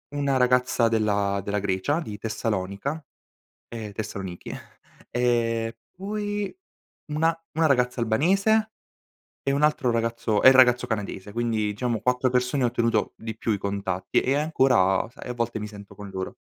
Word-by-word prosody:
una 140 -2 +1
ragazza 125 -1 +3
della 100 -3 +1 0.2
Grecia 100 - 0
di 105 -9 -6
Tessalonica, 110 +6 -3 0.7
ehm, 110 -3 -6
Tessanichi; 95 -4 -6 0.6
e 115 -2 0 0.2
poi 205 - -3 0.6
una 160 +2 +2 0.2
una 160 +1 +2
ragazza 125 -4 +2
albanese 195 - +2 0.7
e 140 - +1
un 140 +2 +1
altro 150 -5 +2
ragazzo 115 -2 0
e 130 - +10
il - - +6
ragazzo 125 -1 +5
canadese. 105 -2 -4
Quindi 115 -2 0
diciamo 115 +1 -2
4 125 0 +1
persone 125 +2 +1
ho 120 - +4
ottenuto 115 -2 0
di 110 -1 -6
più 115 - -2
i 105 - +1
contatti 100 -2 -1
e 135 +2 +1
ancora, 130 -11 +3
sai, 125 0 -10
a - - -2
volte 120 -2 -2
mi 105 - -4
sento 100 -1 -12
con 100 0 -9
loro. 95 -1 -5
115 Hz, 150 wpm, -25 LUFS, 105-135 Hz, 0.7 s, e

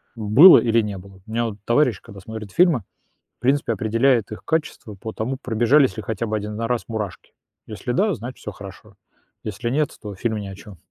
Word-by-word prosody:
было, 115 - +8
или 115 -1 +2
не 105 -2 -4
было. 95 0 -14
У 110 - -12
меня 115 +1 0
вот 110 -3 -5
товарищ, 120 -4 +2
когда 100 - -12
смотрит 110 0 -8
фильмы, 170 - +3 0.6
в - - -54
принципе, 140 +3 +1
определяет 115 0 +1
их 110 - -8
качество 150 -9 -3
по 110 +3 -7
тому, 120 +5 -3
пробежались 120 -1 +3
ли 110 - -5
хотя 110 +1 -3
бы 110 - -1
1 105 0 -4
на 115 +1 -2
раз 125 -1 -1
мурашки. 105 -4 -6 0.3
Если 110 +3 -5
да, 200 - +2
значит, 125 -2 -7
всё 105 - -7
хорошо. 100 -2 -12 0.5
Если 110 +3 -4
нет, 150 +4 +1
то 105 -2 -7
фильм 110 +3 -2
ни 100 -1 -5
о 95 - -8
чем. 100 -1 -13
110 Hz, 210 wpm, -22 LUFS, 105-125 Hz, 0.6 s, было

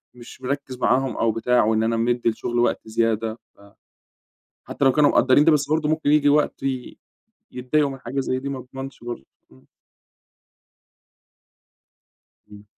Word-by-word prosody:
مش 125 +1 -13
مركِّز 135 -1 -4
معاهم 130 +1 +1
أو 115 -1 +1
بتاع، 125 +2 +2
وإن 110 0 +1
أنا 115 0 0
مدِّي 120 +1 +1
الشغل 120 +1 -3
وقت 120 - +1
زيادة، 115 0 -1 0.2
ف - - -28 1.1
حتّى 140 - -2
لو 135 - +5
كانوا 150 0 +4
مقدرين 130 +3 +4
ده 165 - +5
بس 140 -2 +1
برضو 155 0 0
ممكن 155 -2 0
ييجي 150 -1 +4
وقت 150 +1 +1
ي 130 -2 -4 0.5
يتضَّايقوا 140 +4 0
من 135 - -8
حاجة 130 +2 -3
زي 130 -1 -2
دي، 140 +1 -5
ما 135 - -4
اضمنش 135 0 -9
برضو 120 - -7 0.3
آمم. 130 - -22 2.8
امم. 105 0 -14
130 Hz, 155 wpm, -22 LUFS, 120-140 Hz, 2.8 s, لو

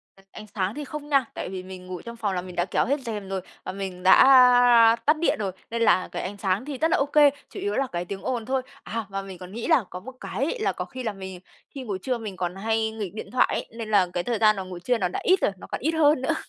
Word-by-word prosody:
À, 195 - -21
ánh 215 - -10
sáng 190 +2 -1
thì 295 - -5
không 295 +1 -7
nha, 275 -3 +3
tại - - -5
vì 185 -1 -6
mình 185 -1 -10
ngủ 180 -2 -6
trong 235 0 -8
phòng 210 -4 -2
là 180 - -1
mình 180 -1 -10
đã 175 - +1
kéo - - 0
hết 280 +3 0
rèm 210 -5 -5
rồi 190 -1 -2 0.2
và - - -4
mình 190 -2 -6
đã, 190 - +6
a, 245 -3 +7
tắt 305 +1 +4
điện 335 - +1
rồi 195 -3 -2 0.2
nên 230 0 -2
là 185 -5 +4
cái - - -4
ánh 200 +3 -5
sáng 195 +5 -1
thì 285 -3 -5
rất 320 +3 +1
là - - +4
OK, 285 0 +4 0.2
chủ - - -8
yếu 405 +1 -2
là 270 -1 0
cái 175 -4 -4
tiếng 195 +1 -6
ồn 240 -4 -2
thôi. 265 0 0 0.2
À, 225 -1 -4
mà 195 0 -3
mình 190 -2 -9
còn 180 +1 -10
nghĩ 230 +2 -5
là 315 -9 +4
có 180 - -7
một 260 +8 -9
cái 275 - -2
là - - +2
có - - -5
khi 255 -1 -8
là 220 - -2
mình 190 -2 -8 0.3
khi 270 -3 -8
ngủ 205 -5 -3
trưa 250 +5 -2
mình 210 -5 -7
còn 180 0 -3
hay 220 +2 0
nghịch 210 -4 -5
điện 215 - -8
thoại 255 - +3
ấy, - - -3
nên 225 -2 -5
là 195 -4 +4
cái 175 - -1
thời 235 -2 -1
gian 215 -1 +5
mà 195 - -4
ngủ 185 -1 -8
trưa 245 +7 0
nó 185 -5 0
đã - - -4
ít 375 +1 +4
rồi, - - +2
nó - - -11
còn - - -5
ít 315 - +1
hơn 305 -4 +3
nữa. 265 - +1
220 Hz, 300 wpm, -25 LUFS, 190-260 Hz, 0.3 s, a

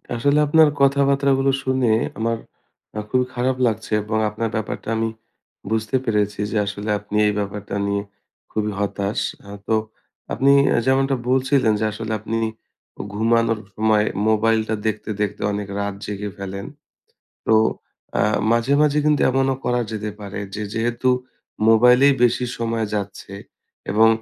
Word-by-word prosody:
আসলে 140 +5 +2
আপনার 160 +1 +6
কথাবার্তা 140 0 +3
গুলো 135 0 +3
শুনে 130 -3 +1 0.3
আমার 115 +1 0 0.7
খুবই 125 +1 +2
খারাপ 125 +1 0
লাগছে। 110 -1 -3
এবং 110 +1 -2
আপনার 110 +2 -3
ব্যাপারটা 110 -1 -4
আমি 115 0 0 0.6
বুঝতে 110 +3 0
পেরেছি 105 -2 0
যে 110 - 0
আসলে 105 +1 -5
আপনি 105 +1 -8
এই 105 - +1
ব্যাপারটা 100 0 -4
নিয়ে 100 0 -1 0.5
খুবই 105 -1 -1
হতাশ। 100 0 -1 0.3
আ - - -11 0.2
তো 110 - +2 0.6
আপনি 135 +1 +3 0.2
অ্যা - - +3
যেমনটা 135 +1 +3
বলছিলেন 130 -3 +3
যে 110 - 0
আসলে 110 +1 -5
আপনি 115 +2 -3 0.6
ও - - -2
ঘুমানোর 115 +1 +2 0.2
সময় 110 -1 +3 0.2
মোবাইলটা 110 0 +2
দেখতে, 110 0 -3
দেখতে 105 -1 -2
অনেক 100 -1 -3
রাত 100 0 -2
জেগে 105 0 -4
ফেলেন। 100 0 -6 0.8
তো - - +3 0.7
আ - - +4 0.3
মাঝে, 115 +4 +2
মাঝে 150 -1 +3
কিন্তু 150 -1 +3
এমনও 135 0 +1
করা 125 0 +1
যেতে 110 -1 -3
পারে 100 -1 -6 0.2
যে 105 - -3
যেহেতু 120 +2 0 0.6
মোবাইলেই 125 +5 +6
বেশি 120 +1 +2
সময় 115 -1 -1
যাচ্ছে, 100 -1 -5 0.6
এবং 110 +2 +5
110 Hz, 145 wpm, -21 LUFS, 105-130 Hz, 0.8 s, আপনার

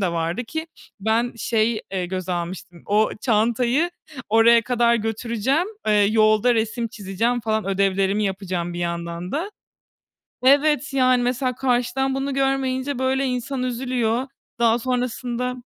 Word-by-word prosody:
de 180 -3 0
vardı. 170 +8 -2
Ki 315 +7 -5 0.3
ben 225 +4 +1
şey, 225 -1 0
eee, 185 -2 -1
göze 185 0 -4
almıştım, 175 0 -6
o 210 +2 +2
çantayı 240 +8 +1 0.4
oraya 230 +2 +5
kadar 240 0 +2
götüreceğim, 230 - -1 0.2
eee, 215 - +3 0.2
yolda 215 +2 +4
resim 230 +1 -1
çizeceğim 220 +4 -2
falan 220 -2 -1
ödevlerimi 195 +1 +1
yapacağım 185 -3 -3
bir - - -5
yandan 170 +1 -4
da. 340 +8 -2 0.9
Evet, 290 +2 +3
yani, 255 -2 +3
mesela 250 +1 -1
karşıdan 260 +1 0
bunu 270 +1 -2
görmeyince, 270 0 0
böyle, 265 +1 +1
insan 250 +1 -2
üzülüyor. 250 -1 -1 0.3
Daha 235 0 +3
sonrasında 250 0 -2
235 Hz, 130 wpm, -22 LUFS, 205-255 Hz, 0.9 s, oraya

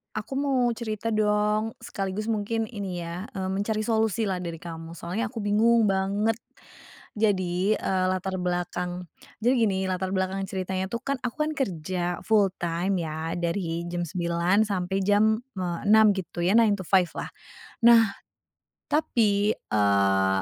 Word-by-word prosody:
Aku 215 +5 -5
mau 265 -4 +2
cerita 225 -1 -3
dong. 210 +1 +1
Sekaligus 195 +2 -4
mungkin 225 +1 -1
ini 195 -5 -4
ya, 170 +4 -6
mmm, 190 -2 -3
mencari 215 +1 -1
solusi 220 -1 +1
lah 190 -3 -1
dari 170 -2 -5
kamu. 165 -1 -8
Soalnya 180 +7 -3
aku 230 -4 -6
bingung 225 +3 +4
banget. 200 +3 +1 0.8
Jadi, 190 -1 +1
eee, 185 -1 0
latar 185 0 -2
belakang 180 0 -2 0.4
jadi 245 +3 +4
gini 190 -4 +1
latar 185 0 -2
belakang 190 +1 -1
ceritanya 190 -1 -2
tuh 235 +1 -4
kan 280 0 0
aku 245 +2 -3
kan - - -1
kerja, 180 - -2
full 210 -3 +4
time 175 +2 -1
ya, 160 +1 -4
dari 170 -1 -2
jam 175 0 -2
9.00 170 +4 +1
sampai 190 -1 -1
jam, 210 +2 +3 0.2
eee, 175 -2 -2
6.00, 220 0 +7
gitu 175 -2 -5
ya, 190 - +3
nine-to-five 195 -5 +3
lah. - - -3 0.6
Nah, 230 -3 +6 0.7
tapi, 215 -8 +2
eee, 100 -2 +2
195 Hz, 145 wpm, -26 LUFS, 175-215 Hz, 0.8 s, 6.00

